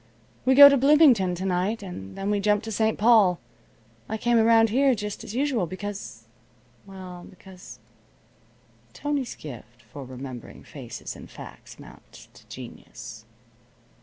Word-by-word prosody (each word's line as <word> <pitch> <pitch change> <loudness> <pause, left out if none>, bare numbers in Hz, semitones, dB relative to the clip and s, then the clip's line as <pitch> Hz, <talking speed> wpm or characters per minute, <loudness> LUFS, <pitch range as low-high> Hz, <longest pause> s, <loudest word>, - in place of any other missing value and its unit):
We 260 0 +4
go 285 +1 +11
to 280 0 +4
Bloomington 265 - +4
to 185 +2 -5
night, 190 +4 -1
and 95 - -9
then 195 +1 -2
we 205 - +1
jump 210 +1 +1
to 225 - -6
St. 220 +1 0
Paul. 210 -5 +4 0.7
I 220 - -3
came 235 +1 +2
around 225 -1 +4
here 265 +2 +3
just 210 -1 -6
as 215 - -8
usual, 255 -8 0
because 190 - -7 0.6
well 185 -2 -10
because 185 0 -14 0.6
" 115 0 -34
Tony's 290 -3 -3
gift 120 -4 -12
for 135 +6 -10
remembering 130 -1 -10
faces - - -9
and - - -12
facts - - -12
amounts - - -16
to - - -19
genius. - - -11
200 Hz, 145 wpm, -25 LUFS, 160-230 Hz, 0.7 s, go